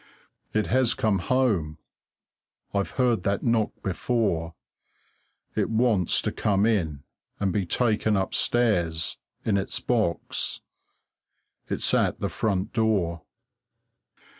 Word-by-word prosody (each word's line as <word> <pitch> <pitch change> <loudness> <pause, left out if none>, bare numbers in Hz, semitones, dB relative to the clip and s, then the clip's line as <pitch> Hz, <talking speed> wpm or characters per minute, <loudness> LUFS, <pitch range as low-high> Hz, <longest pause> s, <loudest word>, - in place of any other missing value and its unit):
It 110 0 +1
has 130 -1 +2
come 105 -3 +1
home. 95 -9 +1 1.0
I've 100 -1 0
heard 125 -6 +2
that 100 +1 -1
knock 115 -3 +2
before. 95 -5 -1 1.0
It - - 0
wants 110 -6 +2
to - - -1
come 100 -1 +1
in 80 -11 0 0.4
and 95 -3 0
be 100 -4 0
taken 110 -1 +2
upstairs, 95 -5 +1 0.3
in 100 -3 +2
its 95 - -2
box. 110 -9 -1 1.1
It's - - +1
at - - +2
the - - -1
front 100 -4 -1
door. 100 -7 +1
105 Hz, 110 wpm, -26 LUFS, 90-115 Hz, 1.1 s, has